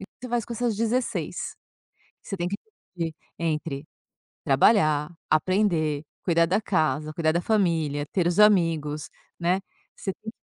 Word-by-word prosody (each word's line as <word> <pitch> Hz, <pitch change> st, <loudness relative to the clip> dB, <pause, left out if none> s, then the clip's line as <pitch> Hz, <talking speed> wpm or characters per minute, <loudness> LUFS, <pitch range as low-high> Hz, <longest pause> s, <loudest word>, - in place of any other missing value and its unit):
o -, -, -7 dB
que -, -, -13 dB, 0.2 s
você -, -, -4 dB
faz 235 Hz, -1 st, 0 dB
com 235 Hz, -, -7 dB
essas 235 Hz, -2 st, -1 dB
16. 230 Hz, +3 st, -1 dB, 0.7 s
Você 195 Hz, -, -5 dB
tem 175 Hz, -1 st, -2 dB
que 195 Hz, -, -3 dB, 0.4 s
dividir 165 Hz, -1 st, -2 dB, 0.3 s
entre 155 Hz, -3 st, -2 dB, 0.6 s
trabalhar, 155 Hz, -7 st, +4 dB, 0.2 s
aprender, 155 Hz, -3 st, +2 dB, 0.2 s
cuidar 170 Hz, -2 st, +4 dB
da 195 Hz, +6 st, +2 dB
casa, 155 Hz, -6 st, 0 dB
cuidar 155 Hz, 0 st, +1 dB
da 170 Hz, -, +1 dB
família, 165 Hz, -8 st, +1 dB
ter 180 Hz, -3 st, +1 dB
os 175 Hz, +3 st, +2 dB
amigos, 165 Hz, -8 st, +3 dB, 0.3 s
né. 180 Hz, +3 st, +1 dB, 0.4 s
Você 195 Hz, -, -3 dB
tem 220 Hz, +1 st, -7 dB
170 Hz, 150 wpm, -26 LUFS, 155-205 Hz, 0.7 s, trabalhar